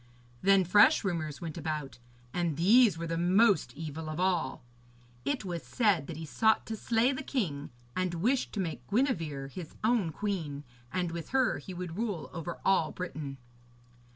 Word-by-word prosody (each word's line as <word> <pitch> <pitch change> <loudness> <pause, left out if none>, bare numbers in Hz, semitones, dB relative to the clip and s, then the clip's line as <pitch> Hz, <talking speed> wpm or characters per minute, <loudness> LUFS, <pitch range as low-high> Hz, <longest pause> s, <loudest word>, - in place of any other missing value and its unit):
Then 195 0 +5
fresh 205 - +6
rumours 160 -6 -2
went 165 -1 -5
about, 155 -5 -4 0.3
and 170 -4 -1
these 210 +1 +6
were 170 - -4
the 165 0 -2
most 190 +1 +4
evil 155 +1 -5
of 155 +2 -4
all. 175 -9 0 0.6
It 275 -7 -1
was 175 -3 -3
said 205 - +1
that 160 - -6
he 160 - -5
sought 220 +8 +2
to 225 - -4
slay 230 +3 +2
the 270 0 -3
king, 175 - -2 0.3
and 185 -1 -1
wished 245 +10 +1
to 210 - -3
make 155 -10 -4
Gwenevere 165 - 0
his 165 +1 -8
own 220 -7 +2
queen, 160 -6 -3 0.3
and 180 -2 -1
with 165 -2 -6
her 260 -1 +2
he 185 - -8
would 175 -1 -5
rule 205 -9 -3
over 170 0 -5
all 185 -5 +3
Britain. 150 -6 -5
175 Hz, 170 wpm, -30 LUFS, 155-210 Hz, 0.6 s, fresh